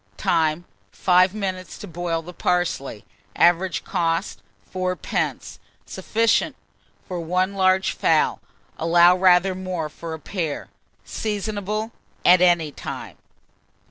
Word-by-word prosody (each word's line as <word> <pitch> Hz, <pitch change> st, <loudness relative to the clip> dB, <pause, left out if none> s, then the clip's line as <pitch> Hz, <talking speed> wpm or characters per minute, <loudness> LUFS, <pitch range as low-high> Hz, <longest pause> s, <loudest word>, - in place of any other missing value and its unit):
Time. 160 Hz, 0 st, +1 dB, 0.3 s
5 185 Hz, +2 st, +3 dB
minutes 185 Hz, -3 st, -4 dB
to 205 Hz, -, -9 dB
boil 170 Hz, -1 st, -3 dB
the 180 Hz, +2 st, -10 dB
parsley. 175 Hz, -12 st, -1 dB, 0.3 s
Average 175 Hz, -2 st, +2 dB
cost, 165 Hz, +3 st, -1 dB, 0.3 s
4d. 185 Hz, -1 st, -3 dB, 0.3 s
Sufficient 230 Hz, +1 st, 0 dB, 0.5 s
for 180 Hz, -2 st, -4 dB
1 180 Hz, +4 st, 0 dB
large 190 Hz, 0 st, +2 dB
fowl; -, -, +1 dB, 0.4 s
allow 170 Hz, +2 st, +5 dB
rather 185 Hz, 0 st, +4 dB
more 185 Hz, -4 st, -4 dB
for 160 Hz, +2 st, -7 dB
a -, -, -11 dB
pair. 160 Hz, -3 st, -4 dB, 0.4 s
Seasonable 215 Hz, +1 st, -3 dB, 0.3 s
at 180 Hz, 0 st, +7 dB
any 170 Hz, -4 st, +3 dB
time. -, -, -8 dB
180 Hz, 110 wpm, -23 LUFS, 170-190 Hz, 0.5 s, at